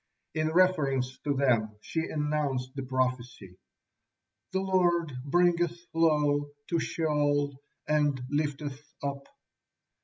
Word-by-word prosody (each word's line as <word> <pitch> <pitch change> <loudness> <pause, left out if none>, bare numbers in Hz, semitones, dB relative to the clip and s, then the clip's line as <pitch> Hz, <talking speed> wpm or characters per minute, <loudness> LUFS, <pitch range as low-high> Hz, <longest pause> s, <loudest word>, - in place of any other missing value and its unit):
In 155 0 0
reference 140 -8 +2
to 145 -1 -1
them 115 -6 +2
she 160 - -3
announced 145 -4 -1
the 135 - -3
prophecy, 125 -7 -2 0.9
"The 190 - 0
Lord 175 -5 +2
bringeth 175 +2 +2
low, 150 -3 +2 0.2
to 170 - +2
Sheol, 145 -3 0 0.3
and 145 -3 +2
lifteth 145 -1 -2 0.2
up." 140 0 -4
145 Hz, 100 wpm, -29 LUFS, 135-160 Hz, 0.9 s, reference